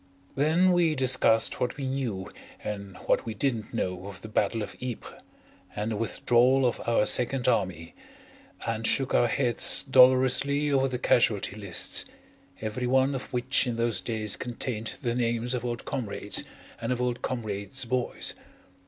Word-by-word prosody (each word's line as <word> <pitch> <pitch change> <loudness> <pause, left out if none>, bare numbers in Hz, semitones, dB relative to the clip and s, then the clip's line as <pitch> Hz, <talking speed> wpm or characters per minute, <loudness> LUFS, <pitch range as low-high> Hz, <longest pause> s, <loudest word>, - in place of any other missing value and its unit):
Then 160 +7 +3
we 170 -3 +2
discussed 130 -4 +3
what 125 +1 -2
we 135 -2 -3
knew 125 -8 -3 0.3
and 100 -2 -6
what - - +2
we 110 -2 -6
didn't 115 -2 -2
know 90 +1 -3
of 100 -2 -10
the - - -7
Battle 105 +1 0
of - - -8
Ypres, 125 -3 -7 0.5
and 105 +2 -2
the - - -2
withdrawal 125 +4 +2
of 120 - 0
our 115 -2 +3
Second 125 +2 +1
Army, 85 -3 -1 0.7
and 115 0 -1
shook 135 -1 +1
our 120 - +4
heads 120 +1 +4
dolorously 130 +2 +4
over 135 -1 +2
the 125 -1 -3
casualty 110 -5 +1
lists, 100 -4 +1 0.6
every 110 +3 -3
one 130 +2 +2
of 130 - -6
which 125 +2 +1
in 120 - -2
those 115 -1 0
days 110 -3 -1
contained 120 -2 -4
the 120 -2 0
names 120 0 -1
of 125 -2 -3
old 120 -1 -4
comrades 125 -7 -2 0.4
and - - -2
of 125 - -1
old 125 -1 -2
comrades' 115 +1 -3
boys. 125 0 -1
120 Hz, 160 wpm, -27 LUFS, 110-130 Hz, 0.7 s, our